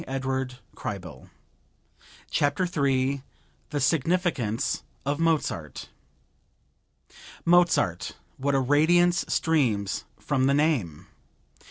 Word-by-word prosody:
New - - -8
York, 130 -1 -1 0.3
June - - -1
7, - - -8 1.2
1905 140 -4 +1 0.5
THE 145 - -2
SIGNIFICANCE 140 - 0 0.2
OF 145 +2 -1
MOZART 155 - -1 1.6
Mozart! 170 - +3 0.2
What 140 +1 0
a - - +4
radiance 170 +6 +3
streams 120 - 0
from 135 -2 0
the 140 - +3
name! 135 - 0
140 Hz, 85 wpm, -26 LUFS, 130-165 Hz, 1.6 s, a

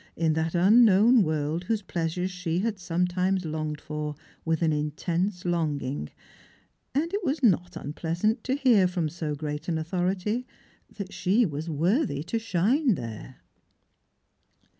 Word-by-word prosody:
in 160 -1 +1
that 160 +1 -1
unl^nown 215 +5 +6
world 155 0 -1
whose 215 +1 -1
pleasures 175 +1 -2
she 180 -2 -2
had 215 -2 -2
sometimes 180 +1 0
longed 155 -1 -3
for 150 -1 -5 0.3
with 165 0 0
an 160 -1 +3
intense 170 +5 -2
longing, 145 - -1 0.9
and 330 +6 0
it 405 0 -1
was 285 -2 -1
not 180 -5 +3
unpleasant 170 - -1
to 260 - 0
hear 240 -9 +4
from 175 -3 -1
so 155 -1 -4
great 150 +1 -5
an 165 -2 0
authority 185 +8 -1 0.4
that 195 -2 -7
she 210 +6 +2
was 155 -1 -4
worthy 165 - +1
to 225 +7 -2
shine 225 - +2
there. 115 0 -7
175 Hz, 140 wpm, -27 LUFS, 155-205 Hz, 0.9 s, unl^nown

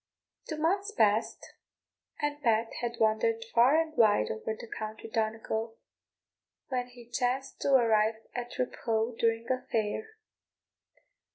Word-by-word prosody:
Two 310 - -3
months 385 +6 +1
passed, 215 - +1 0.7
and 295 0 -2
Pat 225 -2 +2
had 240 -1 -3
wandered 340 - +2
far 255 +7 +6
and 320 -1 -2
wide 205 - +4
over 165 - -3
the - - -7
county 220 0 -6
Donegal, 225 0 -2 0.9
when 250 -2 -1
he 245 -1 -14
chanced 250 +2 -2
to 275 - +4
arrive 220 -3 +4 0.2
at 245 0 -5
Raphoe 230 -2 -1
during 230 0 +1
a 255 0 0
fair. 235 - -2
235 Hz, 125 wpm, -30 LUFS, 220-270 Hz, 0.9 s, far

